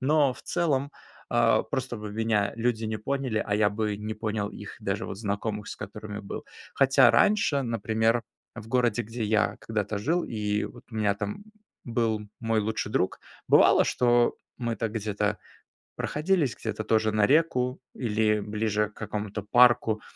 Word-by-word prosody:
Но 140 Hz, 0 st, +3 dB
в 110 Hz, -, -14 dB
целом, 145 Hz, -5 st, 0 dB, 0.4 s
а, 120 Hz, -1 st, +4 dB
просто 130 Hz, +1 st, -3 dB
бы 105 Hz, -1 st, -7 dB
меня 105 Hz, -2 st, +1 dB
люди 115 Hz, -1 st, 0 dB
не 110 Hz, 0 st, -2 dB
поняли, 130 Hz, -2 st, -1 dB
а 100 Hz, -, 0 dB
я 105 Hz, -1 st, +3 dB
бы 105 Hz, 0 st, -2 dB
не 105 Hz, +1 st, -5 dB
понял 110 Hz, -1 st, -2 dB
их, -, -, -9 dB
даже -, -, -2 dB
вот -, -, -6 dB
знакомых, 105 Hz, 0 st, -3 dB
с -, -, -6 dB
которыми 105 Hz, 0 st, -7 dB
был. 100 Hz, -, -7 dB, 0.3 s
Хотя 135 Hz, -2 st, +6 dB
раньше, 200 Hz, -9 st, +3 dB
например, 115 Hz, 0 st, +1 dB, 0.3 s
в 110 Hz, -1 st, -8 dB
городе, 120 Hz, -2 st, +2 dB
где 115 Hz, +1 st, -6 dB
я 110 Hz, 0 st, +1 dB
когда-то 105 Hz, -2 st, -2 dB
жил, 165 Hz, +11 st, 0 dB
и 105 Hz, -2 st, -1 dB
вот 120 Hz, -, -10 dB
у -, -, -11 dB
меня 105 Hz, -2 st, +2 dB
там 105 Hz, -, -5 dB, 0.4 s
был 115 Hz, -2 st, 0 dB, 0.2 s
мой 115 Hz, -1 st, +1 dB
лучший 110 Hz, 0 st, -2 dB
друг, 95 Hz, -, 0 dB, 0.3 s
бывало, -, -, +6 dB
что 120 Hz, -1 st, +2 dB, 0.2 s
мы 120 Hz, -2 st, -1 dB
так 110 Hz, -2 st, -2 dB
где-то 105 Hz, -1 st, -1 dB, 0.6 s
проходились, 155 Hz, -4 st, 0 dB
где-то 110 Hz, -1 st, -3 dB
тоже 110 Hz, -1 st, +2 dB
на 105 Hz, -1 st, +4 dB
реку 130 Hz, -4 st, +2 dB, 0.2 s
или 105 Hz, -3 st, +1 dB
ближе 105 Hz, 0 st, -1 dB
к 105 Hz, -, -25 dB
какому-то 105 Hz, -1 st, -4 dB
парку, 115 Hz, -1 st, +4 dB
110 Hz, 165 wpm, -27 LUFS, 105-120 Hz, 0.6 s, Хотя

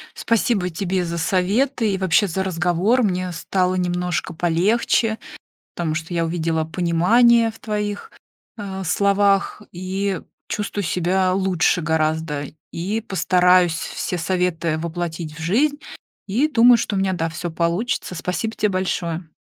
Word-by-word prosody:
Спасибо 220 Hz, -4 st, +1 dB
тебе 185 Hz, +2 st, -1 dB
за 170 Hz, 0 st, -3 dB
советы 205 Hz, +7 st, +1 dB
и 190 Hz, -, 0 dB
вообще 190 Hz, +2 st, +2 dB
за 190 Hz, +2 st, -2 dB
разговор. 180 Hz, +7 st, +1 dB
Мне 185 Hz, -3 st, -1 dB
стало 185 Hz, +2 st, 0 dB
немножко 180 Hz, -1 st, -1 dB
полегче, 205 Hz, +7 st, +1 dB, 0.6 s
потому 165 Hz, -3 st, -2 dB
что 160 Hz, +2 st, -5 dB
я 170 Hz, -1 st, 0 dB
увидела 165 Hz, -1 st, -1 dB
понимание 200 Hz, +9 st, +3 dB
в 225 Hz, -, -15 dB
твоих, 210 Hz, -, -4 dB, 0.5 s
а, 195 Hz, -3 st, -5 dB
словах 200 Hz, +2 st, +2 dB
и 190 Hz, +2 st, -2 dB, 0.3 s
чувствую 205 Hz, -2 st, -3 dB
себя 185 Hz, +2 st, +1 dB
лучше 185 Hz, -2 st, +1 dB
гораздо. 155 Hz, -2 st, -1 dB, 0.3 s
И 200 Hz, +6 st, -2 dB
постараюсь 180 Hz, -3 st, +3 dB
все 180 Hz, +1 st, -4 dB
советы 170 Hz, -2 st, 0 dB
воплотить 165 Hz, -1 st, -4 dB
в 160 Hz, -, -11 dB
жизнь, 275 Hz, -, +1 dB, 0.5 s
и, 230 Hz, +9 st, +2 dB
думаю, 245 Hz, -4 st, +6 dB
что 215 Hz, -, -2 dB
у -, -, +1 dB
меня, 190 Hz, -1 st, +1 dB
да, 165 Hz, -2 st, -2 dB
всё 170 Hz, +2 st, -5 dB
получится. 170 Hz, +6 st, -1 dB
Спасибо 180 Hz, +6 st, -3 dB
тебе 210 Hz, -, +1 dB
большое. 180 Hz, -3 st, -2 dB
185 Hz, 135 wpm, -21 LUFS, 170-205 Hz, 0.6 s, думаю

